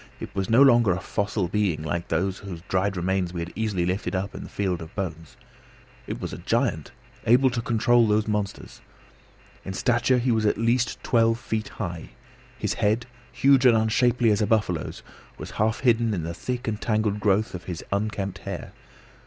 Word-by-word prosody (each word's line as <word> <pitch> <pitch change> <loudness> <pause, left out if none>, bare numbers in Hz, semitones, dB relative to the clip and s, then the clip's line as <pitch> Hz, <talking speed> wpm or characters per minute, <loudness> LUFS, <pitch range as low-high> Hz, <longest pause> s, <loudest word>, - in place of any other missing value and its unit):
It - - -8
was 95 +2 -2
no 120 +5 +7
longer 120 -7 +5
a 90 - -3
fossil 100 0 -2
being 95 -5 0
like 85 +2 -3
him 90 +4 +1
whose 95 -3 -9
dried 95 +1 0
remains 90 0 -1
we 85 - -3
had 85 +2 -6
easily 105 -6 -1
lifted 95 +2 -2
up 95 +2 -2
in - - -7
the - - -9
field 95 -4 -2
of 80 0 -10
bones; 80 -5 -5 0.7
it - - -4
was - - -5
a - - -6
giant, - - -1 0.4
able 130 +3 +5
to 120 -1 -2
control 120 0 +3
those 105 +1 +2
monsters. 105 -2 -3 0.8
In 95 - -5
stature 120 +5 +2
he 125 +1 +1
was 110 -2 +2
at 105 - +1
least 115 +2 0
twelve 115 -1 +3
feet 110 -2 -3
high. 85 -6 -6 0.5
His 105 -3 -1
head, 110 +2 +1 0.3
huge 135 -1 +4
and 120 -3 +6
unshapely 115 +1 +3
as 105 +1 +1
a 105 - +2
buffalo's, 105 -7 -1 0.3
was - - -8
half 110 +2 0
hidden 115 -3 +2
in 85 - -3
the 85 +1 -4
thick 125 +8 -4
and 105 -2 -2
tangled 110 -2 0
growth 105 +1 +1
of 90 -2 -7
his 85 -3 -5
unkempt 100 -1 -2
hair. - - -7
105 Hz, 190 wpm, -25 LUFS, 95-115 Hz, 0.8 s, no